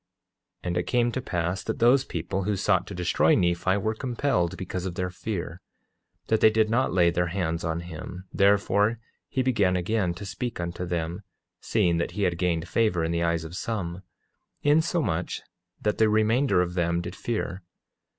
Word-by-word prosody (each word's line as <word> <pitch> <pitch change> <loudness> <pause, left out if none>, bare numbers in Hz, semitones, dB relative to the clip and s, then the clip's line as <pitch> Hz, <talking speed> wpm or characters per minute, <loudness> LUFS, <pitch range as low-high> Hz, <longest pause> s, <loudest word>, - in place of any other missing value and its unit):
8:10 - - -5
And 90 0 -1
it 90 - +1
came 120 -1 +2
to 130 - -3
pass 90 -2 -2
that 110 - -3
those 125 +3 +5
people 90 +1 -3
who 105 0 +1
sought 95 -1 +1
to 100 - -7
destroy 90 -1 +3
Nephi 90 +2 +2
were 110 +2 0
compelled 120 - -1
because 95 0 -4
of 90 - -5
their 90 -1 -2
fear, 90 -3 -5 0.6
that 110 - +1
they - - +8
did 110 0 +2
not 125 +3 +2
lay 85 -1 +4
their 90 +1 0
hands 85 -2 -2
on 80 0 -1
him; 85 +2 -8
therefore 100 +2 +3 0.3
he 130 - 0
began 105 -8 +2
again 90 0 0
to 100 +3 -7
speak 105 +4 -4
unto 85 +1 -4
them, 85 0 -2 0.4
seeing 85 -1 +1
that 85 - -2
he 105 - +1
had 85 -2 0
gained 85 -2 0
favor 105 -7 +1
in 80 - 0
the 85 0 0
eyes 85 -1 +1
of 80 +2 -8
some, 95 -5 -3 0.6
insomuch 145 - +1 0.4
that 105 0 -1
the 110 -1 +5
remainder 110 0 +3
of 90 0 -5
them 85 -1 0
did 85 - -6
fear. 100 -5 -3
90 Hz, 185 wpm, -26 LUFS, 85-110 Hz, 0.6 s, they